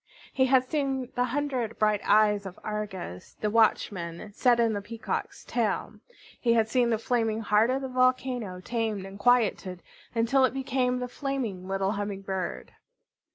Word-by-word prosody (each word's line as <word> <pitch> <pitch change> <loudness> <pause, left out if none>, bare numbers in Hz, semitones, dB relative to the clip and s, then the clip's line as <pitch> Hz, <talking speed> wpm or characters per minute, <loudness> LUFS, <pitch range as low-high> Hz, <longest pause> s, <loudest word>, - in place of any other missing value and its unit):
He 260 -1 +3
had 260 -1 +4
seen 270 -4 -1
the 245 +1 +1
hundred 255 -3 -2
bright 210 -1 +2
eyes 210 -1 +3
of 185 - -10
Argus, 205 - -5
the 210 - 0
watchman, 205 -4 +1
set 240 +2 +3
in 230 -1 +3
the 205 - -2
Peacock's 230 +2 -5
tail. - - -1 0.4
He 235 -2 +3
had 225 -2 +3
seen 240 +1 +2
the 225 - +2
flaming 225 -1 0
heart 215 +1 +3
of 265 +1 0
the - - -2
volcano 255 -6 0
tamed 220 -2 -2
and 195 +1 -10
quieted 200 -6 +2 0.3
until 235 +4 +3
it 260 0 +2
became 255 -2 0
the 250 0 -3
flaming 245 -9 -4
little 195 0 0
Humming 200 -2 -4
Bird. 190 -2 -4
225 Hz, 160 wpm, -28 LUFS, 205-255 Hz, 0.4 s, had